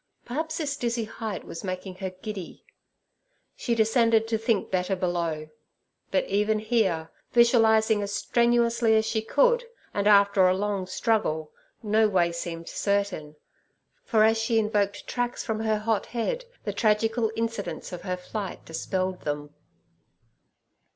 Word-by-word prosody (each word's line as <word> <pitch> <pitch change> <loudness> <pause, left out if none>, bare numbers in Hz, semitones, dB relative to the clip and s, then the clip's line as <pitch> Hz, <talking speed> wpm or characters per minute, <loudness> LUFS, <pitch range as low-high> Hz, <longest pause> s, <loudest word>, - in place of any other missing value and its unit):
Perhaps 315 +6 -3
this 290 -4 -2
dizzy 235 -3 -1
height 215 -2 -5
was 165 - -8
making 185 0 -5
her 190 -1 -3
giddy. 185 0 -8 0.9
She 235 - -1
descended 225 0 +3
to 225 - +1
think 225 -2 0
better 185 +1 0
below. 170 -4 -2 0.6
But 190 - +1
even 210 +2 +1
here, 205 -8 0 0.2
visualizing 220 -3 +4
as 200 0 -3
strenuously 235 0 +2
as 220 0 +3
she 220 0 0
could, 475 - +3 0.3
and 205 0 0
after 200 -2 +6
a 185 - +3
long 200 -2 -2
struggle, 185 -7 0 0.3
no 215 0 +3
way 175 -3 +2
seemed 170 0 -5
certain, 200 -7 -1 0.7
for 220 - +3
as 225 +1 +4
she 225 +1 +1
invoked 205 -2 0
tracks 245 0 -2
from 220 -2 -2
her 220 -1 +1
hot 215 0 -1
head, 475 - -2 0.2
the - - -3
tragical 225 +1 +1
incidents 225 -4 -4
of 175 - -6
her 180 -1 -3
flight 195 +1 -6
dispelled 185 +3 -2
them. 145 0 -4
215 Hz, 140 wpm, -26 LUFS, 185-225 Hz, 0.9 s, after